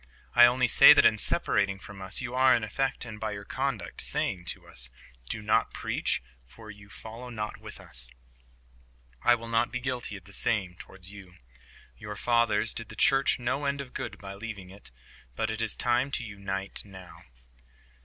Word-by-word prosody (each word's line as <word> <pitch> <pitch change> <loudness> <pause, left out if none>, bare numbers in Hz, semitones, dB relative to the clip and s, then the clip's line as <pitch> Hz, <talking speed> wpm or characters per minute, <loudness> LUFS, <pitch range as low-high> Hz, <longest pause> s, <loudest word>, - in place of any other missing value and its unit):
I 120 0 +9
only 125 0 +3
say - - +9
that - - +5
in - - +5
separating 100 0 +1
from 100 0 -11
us 95 +5 -1
you 125 -1 -4
are 130 0 +6
in 120 - -1
effect, 130 +5 -1
and 110 -2 -8
by 110 -1 -2
your 100 0 -7
conduct, 130 -10 -2
saying 90 -2 0
to - - -6
us, 60 +1 -6 0.4
"Do 105 - -4
not 105 - +2
preach, - - -1 0.2
for 110 - -12
you 100 0 -15
follow 115 +4 -9
not 105 -3 -4
with - - -10
us." 60 0 -5 1.1
I 120 - +6
will 115 0 -8
not 115 0 +1
be 125 - -2
guilty 125 -5 -3
of 95 - -14
the 100 +3 -15
same 100 -4 0
towards 95 +2 -10
you. 95 -3 -12 0.6
Your 105 0 -6
fathers 115 0 +2
did 115 - -4
the - - -9
Church 135 -3 +4
no 130 +4 -1
end 140 0 0
of 135 -3 -7
good - - -5
by 100 -1 -8
leaving 100 -3 -7
it. 100 - -6 0.5
But 110 - -1
it 110 +1 -3
is 110 -1 -1
time 125 +2 +2
to - - -1
unite 100 -2 -3
now." 95 -4 -12
110 Hz, 190 wpm, -29 LUFS, 100-120 Hz, 1.1 s, I